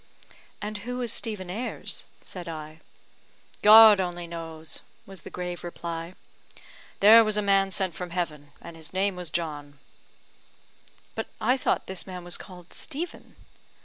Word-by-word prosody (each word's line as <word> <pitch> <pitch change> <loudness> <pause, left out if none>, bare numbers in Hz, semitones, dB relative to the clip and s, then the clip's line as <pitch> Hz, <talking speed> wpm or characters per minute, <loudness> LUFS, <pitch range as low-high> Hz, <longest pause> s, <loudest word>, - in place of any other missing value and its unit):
"And 210 0 -4
who 245 +4 -5
is 240 -3 0
Stephen 200 -6 -3
Ayres?" 230 +7 -3 0.2
said 180 -2 -7
I. 155 0 -7 0.8
"God 215 -1 +10
only 175 -2 -2
knows," 165 -1 -7 0.3
was 195 -3 -9
the - - -9
grave 180 -1 -5
reply. 170 0 -6 0.9
"There 220 +3 +9
was 215 -1 0
a - - +3
man 195 -1 +3
sent 190 -2 -1
from 180 +1 -6
heaven, 155 -5 -4
and 170 - -9
his 160 0 -7
name 195 +1 +1
was 180 -2 -5
John." 150 -3 -4 1.4
"But - - -4
I 250 +4 +3
thought 265 - 0
this 190 0 -5
man 180 -1 -7
was 175 0 -1
called 180 -2 -12
Stephen?" 320 +4 -6
180 Hz, 145 wpm, -27 LUFS, 170-205 Hz, 1.4 s, God